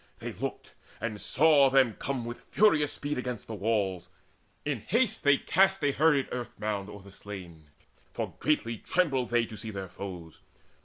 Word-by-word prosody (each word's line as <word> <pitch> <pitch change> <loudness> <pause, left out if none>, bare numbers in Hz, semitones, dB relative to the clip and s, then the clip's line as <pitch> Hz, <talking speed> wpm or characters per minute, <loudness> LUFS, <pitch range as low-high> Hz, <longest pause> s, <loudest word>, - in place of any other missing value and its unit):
They - - -6
looked, - - -5 0.3
and 110 -1 -4
saw 145 -1 +5
them 130 -4 +4
come 130 -1 -3
With 120 0 -6
furious 160 -9 +3
speed 145 -1 -3
against 125 -3 -4
the 115 - -7
walls. 100 -4 -1 0.6
In 145 -5 -1
haste 225 - 0
They 140 -1 +6
cast 195 0 +2
a 145 - +3
hurried 145 -1 +3
earth 125 -2 -5
mound 105 -2 -2
o'er 100 -2 -10
the 100 - -13
slain, 95 -5 -10 0.5
For - - -4
greatly 115 -7 0
trembled 140 -9 +1
they 120 -1 +2
to 110 - -9
see 110 +2 -6
their 95 -3 -6
foes. 90 -4 -8
120 Hz, 170 wpm, -29 LUFS, 100-145 Hz, 0.6 s, They